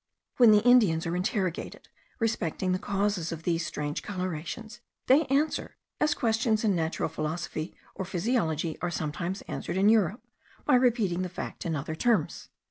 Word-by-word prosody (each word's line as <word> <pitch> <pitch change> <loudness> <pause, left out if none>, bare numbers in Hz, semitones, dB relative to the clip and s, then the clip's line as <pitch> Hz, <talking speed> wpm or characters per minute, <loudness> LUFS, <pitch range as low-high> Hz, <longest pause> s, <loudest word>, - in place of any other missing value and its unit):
When 240 -3 +7
the 210 0 +6
Indians 220 -10 +5
are 170 +1 -1
interrogated 180 -1 -2 0.3
respecting 190 -5 -1
the 185 - +1
causes 200 -4 -1
of 165 -1 -6
these 165 -1 0
strange 150 -1 -3
colorations, 185 +4 -5 0.3
they 280 +3 +4
answer, 290 +4 0 0.2
as 300 -1 +2
questions 225 -1 +1
in 205 -4 +3
natural 160 -1 -1
philosophy 155 +1 -4 0.2
or 195 - -4
physiology 175 - -1
are 175 - 0
sometimes 170 +4 -3
answered - - -4
in 200 +2 +5
Europe, 215 -1 +2 0.4
by 295 - +3
repeating 230 -8 +3
the 185 - -2
fact 180 - -6
in 165 - -1
other 145 +2 -3
terms. 235 +7 0
185 Hz, 155 wpm, -28 LUFS, 165-225 Hz, 0.4 s, When